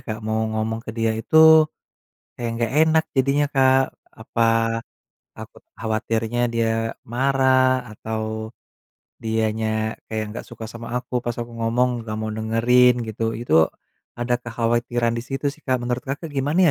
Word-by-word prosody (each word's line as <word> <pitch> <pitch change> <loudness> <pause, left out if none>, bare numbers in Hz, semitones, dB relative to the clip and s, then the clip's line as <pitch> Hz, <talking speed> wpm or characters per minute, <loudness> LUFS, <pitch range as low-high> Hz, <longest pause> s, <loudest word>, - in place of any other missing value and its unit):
Kak, 110 -1 -5
mau 110 0 0
ngomong 110 +1 -2
ke 115 - -6
dia 115 0 0
itu, 160 +7 +6 0.7
kayak 120 -1 -3
enggak 115 -1 -1
enak 160 0 +4
jadinya 140 +2 +2
Kak. 130 0 +5 0.3
Apa, 115 0 +1 0.6
takut - - -11 0.2
khawatirnya 110 +1 -1
dia 115 -1 -1
marah, 130 0 +2
atau 110 0 -4 0.7
dianya 110 0 -1
kayak 110 -1 -2
nggak 115 - -7
suka 115 -1 -9
sama 115 +1 -6
aku, 125 0 -2
pas 120 -1 -2
aku 120 0 -6
ngomong, 115 +2 +1 0.2
nggak 110 -1 -4
mau 110 0 -3
dengerin 115 +3 +4
gitu. 110 +1 -2
Itu 80 -9 +3 0.5
ada 120 0 0
kekhawatiran 120 0 0
di 115 - -3
situ 135 +2 -2
sih, 155 - -18
Kak. 130 -1 +1
Menurut 125 +1 -2
Kakak, 145 +4 -5
gimana 150 +5 +3
115 Hz, 145 wpm, -22 LUFS, 110-130 Hz, 0.7 s, itu